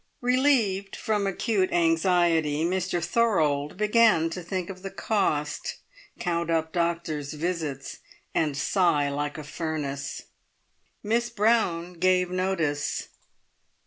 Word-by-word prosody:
Relieved 245 -7 +2
from 210 -2 -1
acute 195 0 0
anxiety, 165 -2 +2
Mr 180 -1 -1
Thorold 160 -9 +1
began 210 -6 +4
to 180 - -5
think 180 0 -3
of 185 -1 -11
the 195 - -5
cost, 170 -9 -1 0.4
count 170 -2 -1
up 160 -1 0
doctors' 165 -4 -1
visits, 155 -4 -3 0.3
and 150 -3 0
sigh 150 -4 +2
like 145 +1 -3
a 155 - -6
furnace; 145 -3 -4 0.8
Miss 235 +3 +1
Brown 210 -6 +1
gave 180 +1 +2
notice. 170 -6 -1
175 Hz, 110 wpm, -26 LUFS, 155-195 Hz, 0.8 s, began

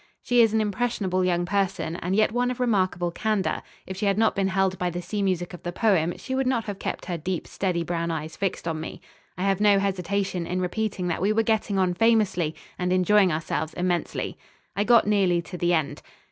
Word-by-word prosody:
She 245 -1 +4
is 225 -2 +5
an 220 0 +2
impressionable 205 -3 0
young 175 -1 +1
person 195 -3 -1
and 180 +2 -2
yet 215 +1 +3
one 245 +2 +1
of 250 - -4
remarkable 185 -7 +1
candour. 215 +1 -1 0.2
If 190 - -6
she 205 - 0
had 200 0 +2
not 225 0 +3
been 195 -1 +1
held 190 0 0
by 180 - 0
the 175 0 -4
sea 205 +3 -3
music 185 -2 -1
of 175 - -9
the 175 - -4
poem, 175 -4 +1
she 260 - -6
would 265 0 0
not 245 -3 +1
have 205 -2 -6
kept - - -4
her 175 -2 -3
deep, 175 +2 -3
steady 180 -3 -1
brown 170 0 -2
eyes 160 -1 -4
fixed 195 -3 -2
on 160 -1 -2
me. 160 - -7 0.4
I 180 - -2
have 195 0 +1
no 205 -1 +5
hesitation 195 -2 -1
in 180 +1 -1
repeating 185 0 -2
that 170 - -2
we 200 +3 +2
were 225 +1 +2
getting 215 -2 0
on 185 -2 +2
famously 195 -6 +2 0.2
and 180 0 0
enjoying 185 +1 +4
ourselves 155 0 -2
immensely. 175 -1 -2 0.4
I 205 - +1
got 235 0 +6
nearly 195 -4 +3
to 180 - -9
the 175 0 +1
end 155 -3 -2
190 Hz, 220 wpm, -25 LUFS, 175-210 Hz, 0.4 s, got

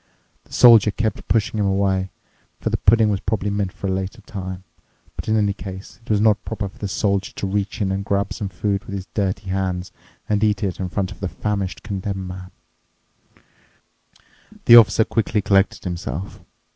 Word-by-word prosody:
The - - -18
Soldier 115 -4 +7
kept 105 0 -2
pushing 110 -1 +1
him 100 - +2
away, 95 -1 +1 0.5
for - - -2
the - - +1
pudding 110 0 +4
was 100 - 0
probably 100 0 -2
meant 100 -2 -1
for - - -8
a 95 - 0
later 95 +4 -3
time, 95 -3 -7 0.5
but - - -7
in 110 0 +2
any 100 -2 +2
case 95 -1 -9
it - - -19
was 105 -2 +3
not 105 -1 +3
proper 100 0 -4
for 95 - -15
the 100 - -3
Soldier 100 0 -1
to - - -3
reach 100 +3 -2
in 95 - 0
and 95 +1 -2
grab 100 0 -1
some 100 - -4
food 100 +3 -2
with 100 - -6
his 95 -1 -5
dirty 95 -1 -2
hands 90 -1 -2 0.4
and 105 0 +1
eat 105 -2 +1
it 95 -3 -2
in 95 -1 -3
front 95 +1 -2
of - - -11
the 95 - -3
famished 100 -2 -3
Condemned 100 -2 -4
Man. 90 0 -8 2.2
The 120 - +9
Officer 115 -1 +7
quickly 110 -1 0
collected 100 -1 +2
himself. 90 -1 -5
100 Hz, 190 wpm, -21 LUFS, 95-105 Hz, 2.2 s, The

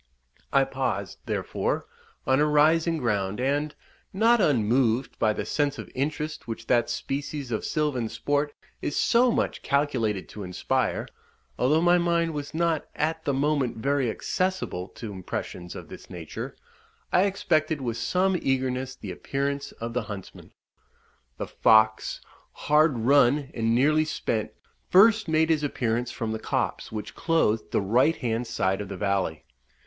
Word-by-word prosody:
I 135 - +5
paused, 135 -2 -3
therefore, - - -1 0.4
on 130 +2 +3
a 150 - +4
rising 160 +3 +3
ground, 105 -6 -1
and, 145 +3 0 0.4
not 225 +3 +4
unmoved 125 - +2
by 110 - +3
the - - -3
sense 145 -2 0
of - - -8
interest 150 +3 -3
which 115 0 -5
that 120 0 +2
species 140 -1 -4
of 110 - -1
silvan 145 -7 -1
sport 145 +3 -1 0.3
is 145 - -2
so 245 +2 +4
much - - -1
calculated 125 -8 0
to 105 - -8
inspire 90 -2 -1 0.5
(although 150 +6 +3
my 175 0 +5
mind 170 -1 +1
was 145 -1 -5
not 165 0 0
at 160 +1 -1
the 140 - +1
moment 140 -4 0
very 135 +1 +1
accessible 185 - -2
to 110 0 -8
impressions 90 -2 -6
of - - -8
this - - -12
nature), 85 -3 -7 0.6
I 185 - +5
expected 160 -6 +1
with 120 -3 -3
some 185 +10 +1
eagerness 130 0 -1
the 100 -7 -7
appearance 140 +8 -3
of 115 +1 -6
the 125 - 0
huntsmen. 100 -3 -9 0.9
The - - -3
fox, 110 0 +3 0.3
hard 150 -2 +3
run, 140 +3 +3
and 115 0 +1
nearly 155 +5 +3
spent, 115 -7 -2 0.4
first 215 +2 +6
made 160 0 +3
his 155 -2 +1
appearance 120 -4 -1
from 115 -2 -4
the 110 - -3
copse - - -2
which 105 -1 -5
clothed 115 -10 +1
the - - +1
right 125 +11 +3
hand 120 -2 -2
side 95 -4 0
of 100 - -6
the 95 - -5
valley. 95 -6 -1
135 Hz, 150 wpm, -26 LUFS, 115-155 Hz, 0.9 s, first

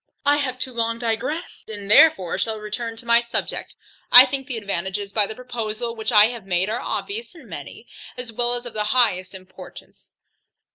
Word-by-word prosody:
I 290 +1 +4
have 260 -3 -2
too 255 0 -5
long 230 0 -1
digressed, 235 +9 -4
and 205 -1 -6
therefore 215 - +5
shall 220 +1 -2
return 225 +2 -5
to 235 - -8
my 235 0 +5
subject. 235 0 -4 0.4
I 250 +1 +11
think 270 0 -4
the 250 -4 -3
advantages 200 0 -3
by 210 -2 +2
the 220 - -7
proposal 235 -1 -5
which 220 +1 -3
I 210 -2 +7
have 235 -5 -9
made 185 +2 0
are 235 - -2
obvious 425 0 -5
and 305 -8 -15
many, 165 - -9 0.3
as 250 -2 -6
well 240 +2 -1
as 245 0 -7
of 240 - -8
the 210 -1 -2
highest 190 -6 +1
importance. 185 0 -14
230 Hz, 190 wpm, -22 LUFS, 205-250 Hz, 0.4 s, I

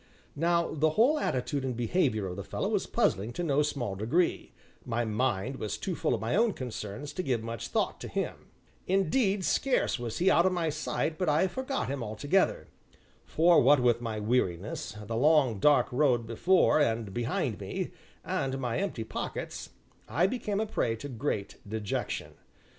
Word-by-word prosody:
Now, 170 +2 +1
though - - -5
the 155 +2 +3
whole 245 - +3
attitude 135 - -1
and 130 -3 -3
behavior 120 - +1
of 90 -1 -4
the 100 - -5
fellow - - -3
was - - 0
puzzling 105 +5 0
to 175 - -3
no 150 -3 +2
small 140 -8 -2
degree, 120 - 0 0.3
my 120 -1 -1
mind 115 +2 -1
was 105 - -3
too - - -3
full - - 0
of - - -4
my 115 +6 0
own 225 0 +3
concerns 125 +1 -6
to 185 - -2
give 125 -9 -1
much 115 -1 -5
thought - - -1
to - - -5
him - - -4 0.4
indeed, 195 +1 +2
scarce 255 - +1
was 120 -2 -4
he 185 +2 +4
out 170 +2 +5
of 185 - +1
my 165 -3 0
sight 155 +1 -2
but 180 -4 +1
I 155 +6 +3
forgot 260 +7 -3
him 135 0 -3
altogether; 145 - 0 0.6
for, 170 +1 +4
what 145 -1 +6
with 120 -1 +2
my 110 -2 -3
weariness, 105 -4 -1
the 115 +2 -4
long, 135 -4 +3
dark 145 +7 +4
road 125 -3 +2
before 155 +10 +3
and 115 -7 0
behind 120 +1 -1
me, - - -4 0.3
and 135 0 -1
my 125 -3 -2
empty 190 - -2
pockets, 110 - -5 0.4
I 155 +11 +2
became 210 -1 -1
a 220 - +1
prey 115 - -1
to 145 +6 -7
great 115 -5 -3
dejection. 110 -2 -3
135 Hz, 180 wpm, -29 LUFS, 115-170 Hz, 0.6 s, what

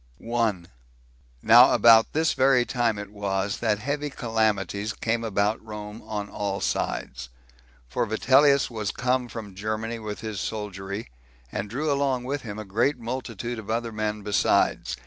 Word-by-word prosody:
1. 110 -6 -1 0.8
Now - - +8
about 115 -1 +6
this 160 0 +2
very 130 -2 +4
time 120 -4 0
it 105 0 -7
was 100 -1 -2
that 110 -3 +1
heavy 145 +6 -3
calamities 110 -4 -1
came 115 +1 -1
about 105 0 0
Rome 105 0 -8
on 105 -1 -3
all 100 -1 -3
sides; 65 0 -3 0.6
for 85 - -1
Vitellius 135 +5 +4
was 110 -3 -3
come 125 0 0
from 110 -4 -8
Germany 110 +3 -3
with 105 -1 -6
his 110 -3 -4
soldiery, 100 - -5 0.4
and 100 - -4
drew 145 +7 -1
along 140 -3 0
with 140 +3 -3
him 105 -3 -7
a 110 - -6
great 115 +9 +1
multitude 120 -1 -5
of 110 - -10
other 115 +1 -1
men 105 -1 -3
besides. 85 -10 +1
110 Hz, 150 wpm, -25 LUFS, 105-120 Hz, 0.8 s, Now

